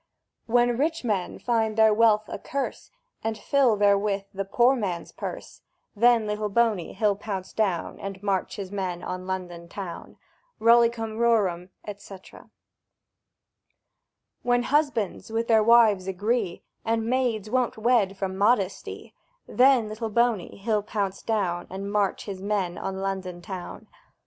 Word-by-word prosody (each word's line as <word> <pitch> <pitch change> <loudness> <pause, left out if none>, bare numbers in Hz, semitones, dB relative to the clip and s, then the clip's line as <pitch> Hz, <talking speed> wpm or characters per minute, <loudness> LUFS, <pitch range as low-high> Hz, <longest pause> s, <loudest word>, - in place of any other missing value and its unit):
When 240 0 +3
Rich 325 +2 0
Men 205 -6 -1
find 225 -2 0
their 220 -1 +6
wealth 215 -1 +4
a - - -6
curse, 275 0 -4 0.3
And 220 0 -2
fill 255 +1 +3
therewith 200 -1 +2
the 195 0 -3
Poor 240 +6 +3
Man's 185 -8 -3
purse; - - -7 0.3
Then 235 +1 +4
Little 210 0 -2
Boney 215 -4 +1
he'll 210 0 +1
pounce 195 -2 -6
down, 195 -6 -1
And 195 0 -7
march 195 -2 -1
his 195 -2 -6
men 185 -3 -3
on 185 0 -5
London 175 -2 -5
town! 190 -3 -8 0.4
Rollicum 230 -1 +3
rorum, 195 -7 +2 0.3
&c. 200 -1 -11 2.3
When 245 0 +2
Husbands 265 -8 0
with 230 +1 -1
their 225 -2 +5
Wives 215 -5 +5
agree, 200 0 -1 0.2
And 225 0 0
Maids 235 -4 0
won't 255 -2 0
wed 215 -4 +2
from 190 -1 -3
modesty; 200 -1 0 0.3
Then 255 -3 +4
Little 220 +1 -4
Boney 235 -4 0
he'll 210 +1 0
pounce 200 -2 -3
down, 185 -6 -1
And 195 +1 -5
march 205 -2 0
his 195 -2 -6
men 195 -3 -1
on 190 0 -4
London 190 -2 -3
town! 180 0 -8
210 Hz, 140 wpm, -26 LUFS, 195-230 Hz, 2.3 s, their